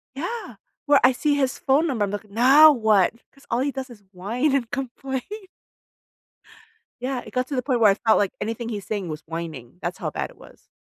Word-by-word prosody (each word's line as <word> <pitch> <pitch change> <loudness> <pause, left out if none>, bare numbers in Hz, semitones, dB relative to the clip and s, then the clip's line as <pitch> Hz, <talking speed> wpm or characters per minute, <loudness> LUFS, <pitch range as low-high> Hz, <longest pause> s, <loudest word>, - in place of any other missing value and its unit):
yeah, 395 - -5 0.3
where 285 -1 +5
I - - +7
see 290 +3 +1
his 270 -2 0
phone 290 +5 +2
number, 235 -8 0
I'm 195 - -5
like, 205 +1 -6
"Now 270 +9 +7
what?" 215 -6 +3 0.2
Because 275 - -22
all 235 - 0
he 280 +2 0
does 265 -1 -6
is 210 -4 -14
whine 235 +10 -1
and 240 -4 -1
complain. 265 0 -4 1.8
Yeah, 255 -1 -2
it - - -12
got 255 0 0
to 280 - -4
the 250 - -1
point 255 -2 0
where 215 -3 +6
I 195 - +3
felt 220 0 +2
like 200 -2 +1
anything 230 +1 -4
he's 205 -4 -5
saying 205 -4 -3
was 155 0 -6
whining, 160 -4 -7
that's 175 +1 -4
how - - -4
bad - - -4
it - - -18
was. - - -18
245 Hz, 215 wpm, -23 LUFS, 205-270 Hz, 1.8 s, I